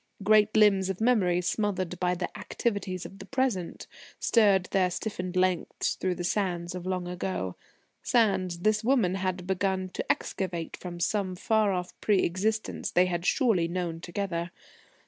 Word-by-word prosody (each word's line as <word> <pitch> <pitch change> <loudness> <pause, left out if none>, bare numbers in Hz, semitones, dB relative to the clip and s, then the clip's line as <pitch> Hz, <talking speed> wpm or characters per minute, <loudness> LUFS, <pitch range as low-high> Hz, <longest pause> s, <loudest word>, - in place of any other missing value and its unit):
Great 215 +1 +4
limbs 195 -3 +5
of 190 - -3
memory, 205 -7 +3
smothered 185 -2 -1
by 180 0 +1
the 180 0 -4
activities 200 -5 -3
of 195 - -10
the 195 - -9
Present, 255 -9 -1 0.3
stirred 200 -5 +4
their 185 -2 +3
stiffened 185 -1 -4
lengths 185 -1 +1
through 185 -1 -2
the 175 - -5
sands 175 -2 -1
of 180 0 -6
long 185 -1 -2
ago 180 - -3 0.5
sands 195 -7 +2
this 215 +2 +2
woman 230 -7 +3
had 185 -1 -2
begun 190 0 -1
to - - -1
excavate 175 -4 -3
from 175 -1 -8
some 185 +1 0
far 215 +2 +2
off 180 -1 -3
pre 205 -3 +3
existence 215 +5 -1
they 180 - +4
had 175 0 -2
surely 220 - +3
known 170 -1 -3
together. 175 -1 -3
185 Hz, 155 wpm, -28 LUFS, 180-205 Hz, 0.5 s, limbs